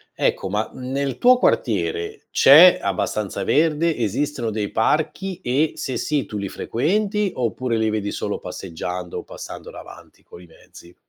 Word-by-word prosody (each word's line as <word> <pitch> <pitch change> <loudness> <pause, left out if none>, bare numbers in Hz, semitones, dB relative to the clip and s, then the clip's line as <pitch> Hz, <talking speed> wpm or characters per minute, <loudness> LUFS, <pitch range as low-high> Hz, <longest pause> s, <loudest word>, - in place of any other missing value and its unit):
Ecco, - - 0
ma 105 +3 -1
nel 130 0 -3
tuo 250 +1 +5
quartiere 430 - -1
c'è 165 +7 +8
abbastanza 100 +1 -2
verde? 160 - +2
Esistono 120 +3 -1
dei 105 -1 -3
parchi 175 +9 -1
e, 150 +2 0
se 130 - -4
sì, 145 -5 -1
tu 105 - -6
li 100 -1 -3
frequenti 200 - -1
oppure 125 0 -1
li 110 -1 +1
vedi 105 -1 -2
solo - - -3
passeggiando, 90 0 -6
passando - - -9
davanti - - -13
coi 90 - -14
mezzi? 85 +1 -17
130 Hz, 140 wpm, -22 LUFS, 105-165 Hz, -, c'è